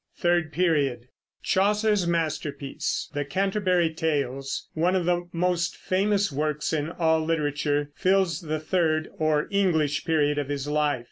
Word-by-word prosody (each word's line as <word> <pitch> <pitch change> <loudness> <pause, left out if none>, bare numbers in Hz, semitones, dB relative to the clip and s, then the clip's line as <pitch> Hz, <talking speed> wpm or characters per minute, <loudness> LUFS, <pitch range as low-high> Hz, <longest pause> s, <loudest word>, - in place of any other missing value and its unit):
THIRD 175 -3 +1
PERIOD. 145 -8 +1 0.4
Chaucer's 210 -1 +2
masterpiece, 155 -4 -2
the 145 0 -1
Canterbury 185 +1 +1
Tales, 140 -4 -2
one 175 +4 +1
of 180 -2 0
the 175 0 0
most 175 0 0
famous 200 0 +1
works 150 +2 -1
in 155 0 -1
all 160 -2 +1
literature, 145 -2 -1
fills 190 0 +1
the 155 -2 -3
third 155 -1 0
or 155 -1 +1
English 160 -8 +1
period 150 -3 +1
of 145 -1 -3
his 145 -1 -3
life. 150 -2 +1
160 Hz, 135 wpm, -26 LUFS, 150-180 Hz, 0.4 s, Chaucer's